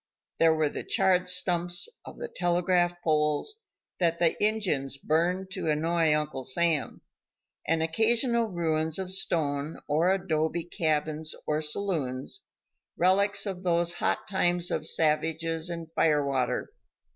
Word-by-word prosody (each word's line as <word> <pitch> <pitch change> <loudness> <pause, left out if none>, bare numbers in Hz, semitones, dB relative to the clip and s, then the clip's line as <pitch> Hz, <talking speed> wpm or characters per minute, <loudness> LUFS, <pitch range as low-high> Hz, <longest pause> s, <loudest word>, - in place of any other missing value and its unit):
There 165 -1 +5
were 155 -1 +1
the - - -5
charred 185 -1 +2
stumps 175 -1 +1 0.2
of - - -10
the 480 - -5
telegraph 175 - +1
poles 155 - +1 0.4
that 170 -2 +1
the 170 -2 +2
Injuns 175 -11 +1
burned 175 +6 0
to 185 -5 -3
annoy 160 +1 +2
Uncle 150 -3 -3
Sam, 160 +4 0 0.6
and 160 +1 +1
occasional 230 +7 +2
ruins 160 -4 -1
of 190 -1 -4
stone 150 -5 0
or 160 +5 +2
adobe 170 -3 0
cabins 155 -2 -1
or 150 0 0
saloons, 150 - -2 0.6
relics 200 +3 +3
of 190 -3 -4
those 170 -1 +1
hot 175 - -1
times 175 -2 +1
of 155 - -1
savages 160 +1 +1
and 165 -2 -6
fire 150 -4 +2
water. 130 -3 -1
170 Hz, 130 wpm, -28 LUFS, 155-180 Hz, 0.6 s, There